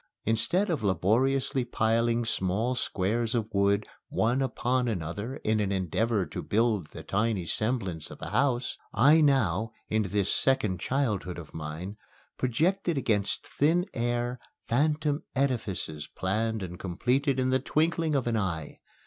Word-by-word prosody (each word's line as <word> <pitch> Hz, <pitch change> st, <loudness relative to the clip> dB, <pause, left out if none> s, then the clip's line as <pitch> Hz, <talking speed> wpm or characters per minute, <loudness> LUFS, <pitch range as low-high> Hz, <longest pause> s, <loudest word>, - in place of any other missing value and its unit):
Instead 175 Hz, -, +2 dB
of 155 Hz, -7 st, -1 dB
laboriously 120 Hz, +8 st, +2 dB
piling 115 Hz, 0 st, +1 dB
small 110 Hz, +4 st, 0 dB
squares 115 Hz, +1 st, 0 dB
of 110 Hz, -2 st, -2 dB
wood 100 Hz, +1 st, +2 dB, 0.2 s
one 120 Hz, +4 st, +1 dB
upon 125 Hz, -1 st, 0 dB
another 100 Hz, +5 st, -3 dB
in 110 Hz, 0 st, +2 dB
an 100 Hz, -2 st, 0 dB
endeavor 100 Hz, +3 st, 0 dB
to -, -, -6 dB
build 110 Hz, -6 st, +1 dB
the -, -, -10 dB
tiny 105 Hz, -2 st, 0 dB
semblance 95 Hz, -, -1 dB
of -, -, -11 dB
a -, -, -6 dB
house, 130 Hz, -3 st, +1 dB, 0.2 s
I 145 Hz, +7 st, +6 dB
now, 130 Hz, -6 st, +2 dB, 0.2 s
in 110 Hz, 0 st, +2 dB
this 100 Hz, -1 st, 0 dB
second 110 Hz, -9 st, +1 dB
childhood 105 Hz, -8 st, -1 dB
of 85 Hz, -4 st, -10 dB
mine, 80 Hz, +6 st, -6 dB, 0.4 s
projected 165 Hz, +7 st, +1 dB
against 105 Hz, -6 st, 0 dB
thin 165 Hz, +5 st, +2 dB
air 120 Hz, +1 st, -1 dB, 0.3 s
phantom 150 Hz, +3 st, +1 dB
edifices 100 Hz, -, -1 dB
planned 110 Hz, +3 st, -1 dB
and 90 Hz, -1 st, -7 dB
completed 125 Hz, -, 0 dB
in 130 Hz, 0 st, +1 dB
the 130 Hz, -, +3 dB
twinkling 160 Hz, +3 st, +1 dB
of 135 Hz, -, +1 dB
an 120 Hz, -2 st, +1 dB
eye. 85 Hz, -7 st, -3 dB
115 Hz, 140 wpm, -28 LUFS, 100-130 Hz, 0.4 s, I